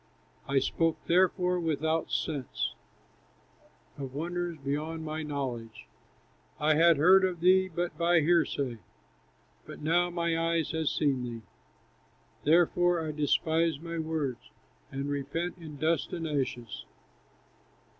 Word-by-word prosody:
I 140 - +1
spoke, 165 +4 +1
therefore, 180 0 +2
without 160 0 0
sense, 135 - -2 1.3
Of 135 -1 -6
wonders 175 +2 -3
beyond 155 +3 -3
my 155 +1 -3
knowledge. 130 -7 -5 0.7
I 155 +1 +3
had 165 +1 +5
heard 185 +6 +6
of 185 -2 0
thee 185 +2 +5
but 175 -1 -3
by 170 0 +4
hearsay, 145 -7 +1 0.9
But - - -10
now 175 +3 +2
my 170 -1 -1 0.2
eye 165 - +2
has 160 -2 0
seen 140 -4 +1
thee; 120 -2 -6 1.0
Therefore 175 +2 +4
I 155 - -2
despise 160 +1 +1
my 170 +1 -5
words, 155 -6 -3 0.4
And 135 +1 -3
repent 145 +6 -3
in 155 -3 -9
dust 160 +3 0
and 165 -2 -3
ashes." 130 -6 -3
160 Hz, 120 wpm, -29 LUFS, 140-170 Hz, 1.3 s, heard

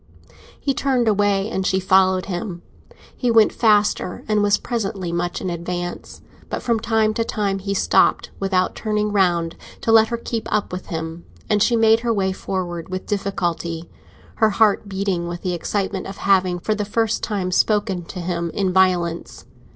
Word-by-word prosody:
He 275 - 0
turned 260 -4 +1
away, 205 -1 +2
and 190 - -1
she 190 0 +1
followed 190 0 +3
him; 180 -2 -5 0.5
he 250 - -1
went 225 -2 +5
faster, 210 -5 +2
and 215 -1 +2
was 205 0 +3
presently 195 -7 -3
much 175 +1 -2
in 185 - -2
advance. 175 +1 -5 0.3
But - - -4
from 235 -2 +1
time 220 -1 +1
to 230 - 0
time 200 -3 -1
he 200 +1 -3
stopped, - - +2
without 190 -2 +1
turning 210 -1 -1
round, 175 -4 +1 0.3
to 225 - +1
let 220 0 +6
her 235 - -2
keep 230 -1 -4
up 210 - 0
with 180 +1 -6
him, 165 0 -5 0.3
and 210 -1 +3
she 235 - +3
made 225 0 +5
her 235 0 -1
way 195 -3 +1
forward 180 -3 -4
with 185 0 -4
difficulty, 175 -5 -3 0.5
her 220 - +4
heart 210 -1 +2
beating 190 -3 -1
with 175 0 -6
the 180 - -1
excitement 190 +2 -2
of 195 - -8
having 185 -2 +2
for 200 +5 -1
the 210 0 -2
first 225 +2 0
time 195 -4 -2
spoken 200 -1 +1
to 180 +1 -7
him 170 -1 -2
in 190 -2 0
violence. 180 -3 +1
195 Hz, 175 wpm, -21 LUFS, 180-215 Hz, 0.5 s, let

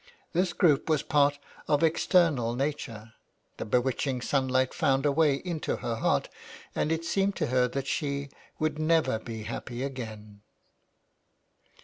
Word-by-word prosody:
This 180 +1 +2
group 155 -3 +3
was 155 -2 +2
part 145 -1 +3 0.3
of 145 +1 +2
external 160 -7 +3
nature. 120 -5 -4 0.4
The - - -4
bewitching 125 +3 0
sunlight 130 -1 +1
found 135 -4 +1
a 145 - +4
way 150 -1 +3
into 165 +2 -3
her 115 -1 -3
heart, - - +1 0.5
and 155 - 0
it 165 +1 -1
seemed 195 +3 +1
to 160 - 0
her 125 -1 +4
that 135 +2 -3
she 140 0 -2 0.3
would 155 -1 -1
never 155 -7 +2
be 110 -1 -7
happy 120 +3 -5
again. 110 -6 -7
140 Hz, 140 wpm, -28 LUFS, 125-155 Hz, 0.5 s, a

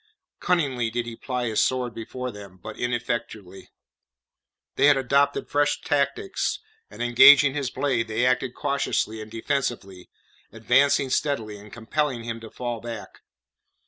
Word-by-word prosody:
Cunningly 135 -10 0
did 120 +1 -3
he 115 -1 -7
ply 125 0 -3
his 110 -2 +1
sword 125 -2 -1
before 125 +3 -6
them, 100 -3 -12
but 110 +4 -9
ineffectually. 120 -5 -4 1.1
They - - +4
had 145 -2 +6
adopted 140 +2 +1
fresh 145 0 +1
tactics, 145 +5 -1 0.3
and - - -6
engaging 135 +3 +7
his 140 -3 -2
blade 130 -4 -1
they 110 +3 0
acted 125 0 0
cautiously 140 -6 -1
and 110 - -9
defensively, 115 -6 -3 0.4
advancing 130 +4 +2
steadily, 115 -8 -1
and 105 +1 -14
compelling 120 +2 -2
him 115 0 -5
to 115 -1 -10
fall 120 -1 -5
back. 115 -3 -8
120 Hz, 140 wpm, -25 LUFS, 115-140 Hz, 1.1 s, engaging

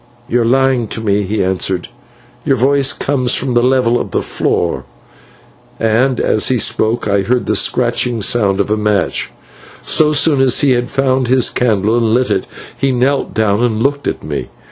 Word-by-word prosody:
"You 120 +1 +1
are - - 0
lying 130 -1 +1
to 110 - -4
me," 105 -2 0
he 100 +1 -2
answered; 95 -1 -2 0.5
"your - - +1
voice 135 +2 +2
comes 130 -3 -1
from 130 0 -2
the 120 - +3
level 125 -1 +2
of - - -6
the - - -2
floor." 75 -6 -2 1.0
And 115 +4 +1
as 110 - +1
he 130 - +1
spoke 110 0 0
I 100 -1 +1
heard 120 +5 -1
the - - 0
scratching 120 -2 0
sound 100 -5 +1
of - - -1
a 110 - +1
match. 105 -1 -1 0.5
So 155 -1 +3
soon 150 -2 +2
as 130 -2 +3
he 140 - +3
had 120 0 0
found 130 -2 0
his 130 0 +2
candle 110 -3 0
and 115 -1 +1
lit 125 +1 0
it, - - -1 0.3
he 135 - 0
knelt 130 +3 -1
down 110 0 +1
and 115 -2 0
looked 140 +1 -1
at - - -4
me. - - -5
120 Hz, 190 wpm, -15 LUFS, 110-130 Hz, 1.0 s, the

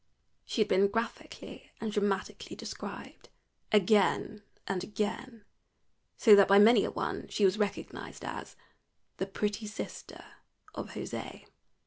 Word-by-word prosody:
She 230 - -1
had 215 - +3
been 195 +2 +4
graphically 225 +3 -5
and 220 -1 -3
dramatically 205 -2 -2
described - - -8 0.4
again 210 +1 +3 0.2
and 190 -2 -2
again, 215 +2 -4 0.7
so 215 -3 +8
that 200 -1 +6
by 200 - +6
many 210 +1 +7
a - - -1
one - - -4
she 205 - +1
was 190 +3 +2
recognized 205 -1 -4
as - - -6 0.6
"the 190 - -2
pretty 210 +2 -2
sister 210 - -7 0.5
of - - -6
José." - - -6
210 Hz, 125 wpm, -30 LUFS, 200-215 Hz, 0.7 s, so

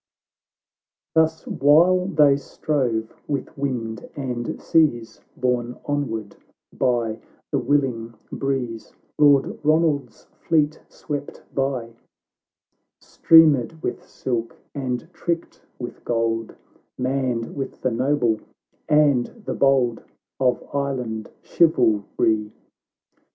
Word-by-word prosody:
xv - - -70
Thus 160 0 +2
while 170 +6 +4
they 150 -7 +5
strove 130 -5 -2
with 140 -2 -3
wind 120 -6 -3
and 125 -4 -4
seas, 120 -9 +1 0.2
Borne 125 -1 -1
onward 115 -8 -3 0.4
by 115 -3 0 0.3
the - - +1
willing 120 -4 0 0.2
breeze, 125 -5 -3 0.3
Lord 145 -2 +4
Ronald's 155 -2 +1
fleet 155 -1 +1
swept 145 -2 -6
by, 130 -4 -2 1.1
Streamered 160 -3 +4
with - - -3
silk, 115 -3 -4 0.2
and 130 0 -3
tricked 170 -1 -3 0.2
with 120 - -8
gold, 115 -1 -1 0.4
Manned 125 -3 -1
with 135 -2 -5
the 130 - +1
noble 120 -2 +1 0.5
and 145 -5 +4 0.2
the - - -2
bold 130 -4 +2 0.4
Of 130 -2 +1
Island 125 -6 -2
chivalry. 110 - +2
130 Hz, 95 wpm, -23 LUFS, 115-145 Hz, 1.1 s, they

